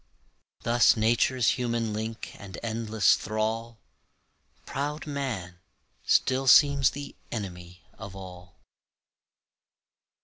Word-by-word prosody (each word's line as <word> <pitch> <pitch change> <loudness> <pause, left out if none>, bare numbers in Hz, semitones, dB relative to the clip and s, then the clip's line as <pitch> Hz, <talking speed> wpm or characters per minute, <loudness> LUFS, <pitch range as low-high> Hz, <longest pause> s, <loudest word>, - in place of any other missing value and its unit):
Thus 120 0 +4
nature's 120 +3 +2
human 115 -3 -1
link 110 +1 -5
and 95 -3 -9
endless 110 -3 +2
thrall, 110 +2 -3 0.9
Proud 150 +4 -4
man, 120 - -4 0.4
still 130 +1 +2
seems 140 0 +6
the 145 0 -8 0.2
enemy 90 -4 -7 0.2
of 100 -2 -9
all. 90 -2 -11
115 Hz, 90 wpm, -27 LUFS, 100-130 Hz, 0.9 s, seems